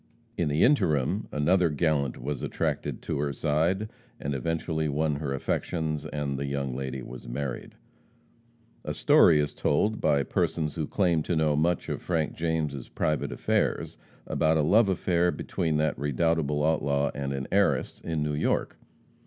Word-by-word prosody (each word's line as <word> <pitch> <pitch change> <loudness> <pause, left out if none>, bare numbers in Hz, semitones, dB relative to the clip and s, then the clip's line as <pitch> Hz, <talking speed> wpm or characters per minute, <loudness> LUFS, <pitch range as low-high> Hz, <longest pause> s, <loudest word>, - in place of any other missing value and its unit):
In - - 0
the 75 +2 +2
interim, 95 - +2
another 85 +4 +3
gallant 75 -4 0
was 70 +1 -4
attracted - - -2
to - - -2
her 70 0 0
side, 80 +9 0 0.3
and 70 - -3
eventually 80 +3 -1
won 75 0 0
her 70 -2 -3
affections, 75 +3 -2
and 70 -2 -3
the 70 - -2
young 70 -2 -2
lady 65 -1 -4
was 60 0 -9
married. 65 +1 -5 1.1
A - - -4
story 75 - +5
is 75 0 -1
told, 105 +9 +1
by 70 -1 +3
persons 75 +3 -1
who 80 -1 -3
claim 85 -5 +2
to 85 - -1
know 80 -2 +2
much 85 +3 +1
of - - -3
Frank 80 -4 -1
James' 80 -5 -2
private 75 -1 -1
affairs, - - 0 0.3
about 80 0 +2
a 75 - +2
love 100 +7 +4
affair 90 -1 +2
between 80 -2 -1
that 75 0 0
redoubtable 75 +1 +1
outlaw 70 -3 +1
and 70 -1 -3
an 65 -1 -3
heiress - - +1
in 80 -2 -2
New 75 0 -1
York. 75 - -1
75 Hz, 160 wpm, -27 LUFS, 70-80 Hz, 1.1 s, story